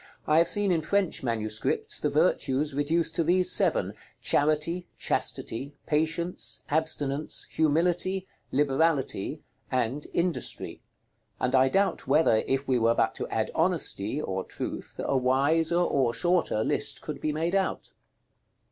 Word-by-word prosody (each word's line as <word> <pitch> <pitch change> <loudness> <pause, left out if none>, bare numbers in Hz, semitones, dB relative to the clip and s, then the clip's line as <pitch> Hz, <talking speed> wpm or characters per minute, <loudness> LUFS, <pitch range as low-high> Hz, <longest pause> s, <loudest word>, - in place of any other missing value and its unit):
I 155 +1 +4
have 170 - +4
seen 205 -2 +1
in 165 -2 +2
French 195 +3 0
manuscripts 110 -3 -1
the - - 0
virtues 140 +3 +1
reduced 160 +3 0
to 165 - +3
these 180 +3 +3
seven, - - +2 0.3
Charity, 155 +4 +1
Chastity, 140 +5 -2
Patience, 160 +3 -1
Abstinence, 150 -2 -1
Humility, 175 +4 +1 0.3
Liberality, 145 -2 0 0.3
and 130 +3 -1
Industry: 175 0 -2 0.6
and 125 - 0
I 130 0 +5
doubt 195 -1 0
whether, 140 -5 +4
if 135 +1 -1
we 130 -2 +2
were 115 +1 +3
but - - +1
to - - -5
add - - -2
Honesty 105 +9 0
(or 95 -9 -3
Truth), - - -7
a - - 0
wiser 140 +6 +2
or 135 -9 +1
shorter 175 -11 +1
list - - 0
could - - -6
be 155 - 0
made 165 +4 -1
out. 195 -1 -1
150 Hz, 135 wpm, -27 LUFS, 135-170 Hz, 0.6 s, I